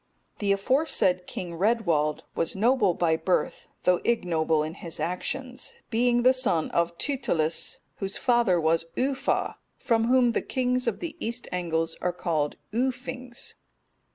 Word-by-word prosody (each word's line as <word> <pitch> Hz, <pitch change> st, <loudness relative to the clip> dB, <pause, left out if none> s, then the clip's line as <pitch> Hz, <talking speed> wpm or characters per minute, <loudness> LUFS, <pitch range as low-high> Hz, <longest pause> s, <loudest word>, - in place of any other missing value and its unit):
The 200 Hz, -1 st, +1 dB
aforesaid 200 Hz, -, +2 dB
King 175 Hz, -2 st, -5 dB
Redwald 170 Hz, -9 st, +1 dB
was 165 Hz, -, -1 dB
noble 220 Hz, -3 st, +3 dB
by 165 Hz, -2 st, +2 dB
birth, 180 Hz, +3 st, -1 dB, 0.2 s
though 180 Hz, -1 st, +3 dB
ignoble 160 Hz, -8 st, +1 dB
in 155 Hz, +1 st, -4 dB
his 170 Hz, -3 st, -8 dB
actions, 255 Hz, +9 st, -4 dB, 0.2 s
being 240 Hz, +1 st, +3 dB
the 255 Hz, +1 st, +6 dB
son 225 Hz, -12 st, 0 dB
of 170 Hz, 0 st, 0 dB
Tytilus, 170 Hz, -, -1 dB, 0.2 s
whose 195 Hz, -1 st, -4 dB
father 235 Hz, -8 st, +3 dB
was 165 Hz, +1 st, +2 dB
Uuffa, 270 Hz, +1 st, 0 dB, 0.2 s
from 225 Hz, -2 st, +1 dB
whom 250 Hz, 0 st, +4 dB
the -, -, 0 dB
kings 250 Hz, -1 st, 0 dB
of -, -, -1 dB
the 330 Hz, -3 st, -4 dB
East 235 Hz, +2 st, -3 dB
Angles 165 Hz, -2 st, -1 dB
are 180 Hz, -, 0 dB
called 155 Hz, -4 st, -1 dB, 0.2 s
Uuffings. 250 Hz, 0 st, -3 dB
200 Hz, 140 wpm, -27 LUFS, 170-250 Hz, 0.2 s, the